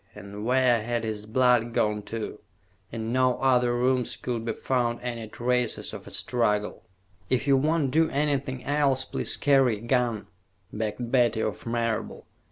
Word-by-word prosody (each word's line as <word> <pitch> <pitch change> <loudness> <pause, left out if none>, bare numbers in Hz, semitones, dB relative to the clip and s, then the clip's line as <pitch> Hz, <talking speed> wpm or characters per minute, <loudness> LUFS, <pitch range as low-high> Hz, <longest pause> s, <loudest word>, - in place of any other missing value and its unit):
And 100 +2 -8
where 125 -2 +3
had 120 +1 -2
his 105 -1 -4
blood 120 0 +2
gone 105 0 +1
to? 115 -1 -5 0.5
In 115 0 -4
no 130 -1 +3
other 125 -2 +2
rooms 125 0 0
could 120 -3 -3
be 115 -1 -2
found 120 -2 -1
any 120 -2 -4
traces 125 +1 -1
of - - -9
a - - -7
struggle. 105 -4 -1 0.5
"If 130 0 +1
you 140 -1 +4
won't 150 0 +1
do 160 +2 +3
anything 140 -3 -1
else, 140 -2 +1
please - - -2
carry 135 -5 +3
a - - -13
gun," 120 -3 0 0.5
begged 110 +2 -3
Betty 120 -4 +3
of 110 +1 -4
Marable. 115 -1 -2
120 Hz, 160 wpm, -26 LUFS, 115-130 Hz, 0.5 s, you